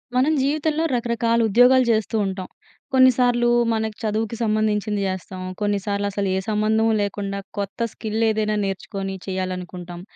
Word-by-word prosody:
మనం 270 +5 +3
జీవితంలో 305 +3 0
రకరకాల 235 -1 +1
ఉద్యోగాలు 250 +4 +5
చేస్తూ 220 0 0
ఉంటాం. 190 -1 -4 0.5
కొన్నిసార్లు 245 -2 +4 0.2
మనకు 220 -1 -2
చదువుకి 220 +1 -1
సంబంధించింది 215 -1 0
చేస్తాం. 185 0 -5 0.2
కొన్నిసార్లు 205 0 -1
అసలు 200 0 -2
ఏ - - +1
సంబంధం 220 +1 +2
లేకుండా 200 -1 -3 0.2
కొత్త 205 +4 -2
స్కిల్ 220 0 -4
ఏదైనా 215 -1 0
నేర్చుకొని 195 0 -4
చేయాలనుకుంటాం. 180 -2 -5
215 Hz, 125 wpm, -22 LUFS, 195-235 Hz, 0.5 s, ఉద్యోగాలు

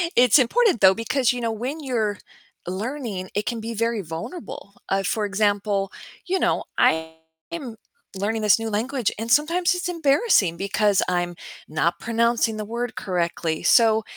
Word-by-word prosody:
It's 245 +2 +6
important, 405 - +2
though, 190 -1 +7
because, 240 +4 +1
you 245 - -5
know, 230 -1 -1
when 250 +8 -4
you're 225 -7 -1 0.5
learning, 205 0 -4
it 205 - -1
can 235 +1 -2
be 230 +1 -5
very 230 0 -1
vulnerable, 195 - -8 0.2
uh, 195 0 +1
for 210 +3 -1
example, 205 -1 0 0.3
you 375 +1 0
know, - - +1
I 160 0 +2 0.4
am 275 -9 -6 0.4
learning 220 +3 -1
this 210 0 +4
new 225 0 -3
language, 235 +3 -1
and 225 +1 -4
sometimes 335 +7 +3
it's 355 -1 -3
embarrassing, 285 - +2
because 200 0 +1
I'm 175 -1 -1 0.3
not 170 +3 0
pronouncing 230 -1 +1
the 215 - -4
word 235 +2 -4
correctly, 170 -3 -2
so 225 -1 +4
220 Hz, 155 wpm, -23 LUFS, 195-245 Hz, 0.5 s, though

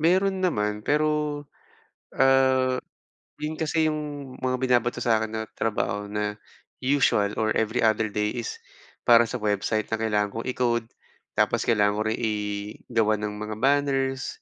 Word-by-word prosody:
Meron 190 +4 +2
naman 105 -11 0
pero, 150 -1 0 0.7
ah, 130 -1 +4 0.6
yun 150 +1 -3
kasi 160 0 +1
yung 145 -3 -5
mga 130 0 +1
binabato 125 -2 +2
sa 115 -2 +3
akin 110 0 -3
na 110 0 -2
trabaho, 105 -2 -1
na 105 0 -2 0.5
usual 125 -7 +2
or 110 0 +1
every 110 +2 +1
other 110 -1 +3
day 105 0 -1
is 455 0 -4 0.5
para 120 -1 +7
sa 125 +3 -4
website 105 +1 0
na 110 - 0
kailangan 105 -2 +1
kong 115 +3 -4
i-code, 120 -2 0 0.5
tapos - - +2
kailangan 105 -3 +3
ko 110 - +1
rin 110 - -1
igawan 105 0 -1
ng 105 0 -3
mga 105 0 -5
banners. 135 -1 +1
120 Hz, 145 wpm, -25 LUFS, 105-135 Hz, 0.7 s, para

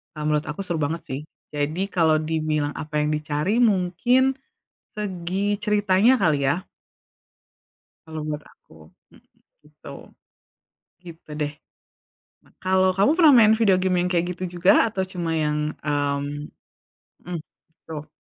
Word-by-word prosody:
eee, 150 - -5
menurut 150 0 +1
aku 150 +5 -6
seru 170 -4 -3
banget 160 +3 -2
sih. 135 +2 -4 0.3
Jadi 150 +5 -1
kalau 160 -3 +3
dibilang 155 -2 -1
apa 150 -1 -3
yang 150 - 0
dicari 150 +8 -1
mungkin 240 +6 +2 0.6
segi 195 0 -2
ceritanya 210 +3 +3
kali 150 -6 +2
ya. 170 +7 0 1.4
Kalau 160 -1 -6
menurut 150 0 -5
aku - - -22 0.4
mhm, - - -27 0.4
gitu. - - -14 1.1
Gitu 165 -3 -13
deh. 145 0 -2 0.9
Nah, - - -26
kalau, 185 0 +3
kamu 200 +8 +4
pernah 325 -4 +6
main 220 -1 +6
video 205 -5 +3
game 185 -1 +1
yang 180 - -1
kayak 175 -1 +1
gitu 185 - -6
juga 180 +2 +5 0.2
atau 190 -2 -2
cuma 175 -3 -4
yang, 150 0 0 0.2
mmm 145 0 -2 0.8
mhm, 175 -1 -4 0.5
tuh. 155 -1 -7
170 Hz, 135 wpm, -23 LUFS, 150-190 Hz, 1.4 s, pernah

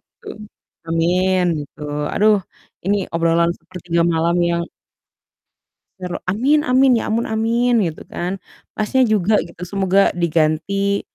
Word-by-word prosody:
gitu. 475 - -25 0.6
Amin, 180 +3 +1 0.2
gitu. 145 0 -12 0.3
Aduh, 215 +1 +4 0.5
ini 200 +2 +2 0.2
obrolan 165 0 +2
sepertiga 175 -2 -3
malam 165 +1 +1 0.2
yang 170 0 0 1.4
ter 180 -1 -5 0.2
amin 270 +10 +2
amin 260 -1 +3
ya - - -4
ampun 230 +2 0
amin 230 +1 +1
gitu 155 - -11
kan, 180 +3 -4 0.4
Mas 215 +3 -3
nya 260 - +4
juga 215 -3 +2
gitu, 175 +1 -9
semoga 195 +1 +2
diganti 170 +4 0
190 Hz, 125 wpm, -19 LUFS, 170-220 Hz, 1.4 s, Aduh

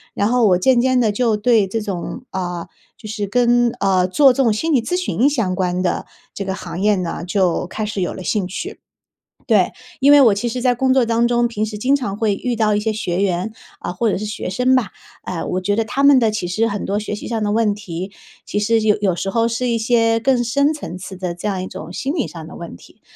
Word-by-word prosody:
然 200 - +1
后 240 -1 +3
我 180 -2 +4
渐 240 +6 +3
渐 255 0 +2
地 225 -3 +2
就 220 0 +1
对 220 -2 +3
这 225 +4 -2
种 205 +5 -5
呃， 175 -2 -4 0.3
就 215 - -10
是 210 -1 -3
跟 240 +2 +3
呃， 190 -2 +2
做 265 +8 +5
这 270 - +1
种 230 - +3
心 320 +8 -1
理 250 - +4
咨 355 +10 -2
询 290 -7 +1
相 225 -10 -1
关 180 0 -1
的 180 - -1 0.3
这 200 - -4
个 190 - -2
行 190 -1 -6
业 210 0 +3
呢 170 -2 -3
就 180 -2 +1
开 215 +3 -4
始 210 -2 -3
有 180 - -1
了 185 - -8
兴 205 -2 0
趣。 350 - -6 0.7
对， - - +3 0.3
因 280 +2 +6
为 290 - +8
我 225 -6 +6
其 235 +4 -2
实 250 +2 -3
在 250 0 +2
工 260 +2 +1
作 260 -3 +3
当 230 +1 +2
中， 240 0 +2
平 215 -2 -2
时 215 -1 -5
经 265 +5 +3
常 205 -8 -4
会 215 -3 +1
遇 245 +3 -2
到 215 -2 +2
一 205 - +1
些 220 +1 -1
学 185 -3 -2
员， 185 +1 0 0.3
啊， - - -5
或 220 +4 0
者 - - -1
是 215 - -4
学 205 -3 -4
生 250 +7 +2
吧， 230 -8 +1 0.3
呃， 175 -3 -4
我 185 - -2
觉 205 +2 +1
得 225 +1 0
他 275 +6 -1
们 280 -1 +7
的 225 -3 +3
其 210 -4 -3
实 215 +6 0
很 205 -1 -3
多 200 +1 -1
学 210 0 -4
习 210 - -7
上 225 -2 -2
的 205 - 0
问 215 -1 +2
题， 190 -1 -6 0.3
其 - - -3
实 225 +2 +2
有 215 -1 +2
有 190 -4 +1
时 195 - -2
候 230 +2 +1
是 240 +2 -1
一 230 -1 +1
些 230 0 +2
更 250 0 +2
深 280 +6 +2
层 185 - -7
次 185 +1 -8
的 180 -2 -4
这 190 +5 -4
样 190 -2 -2
一 - - -5
种 160 -2 -8
心 270 +8 -2
理 295 -9 -1
上 165 -2 -9
的 - - -11
问 170 - -8
题。 - - -19
215 Hz, 275 characters per minute, -19 LUFS, 190-240 Hz, 0.7 s, 为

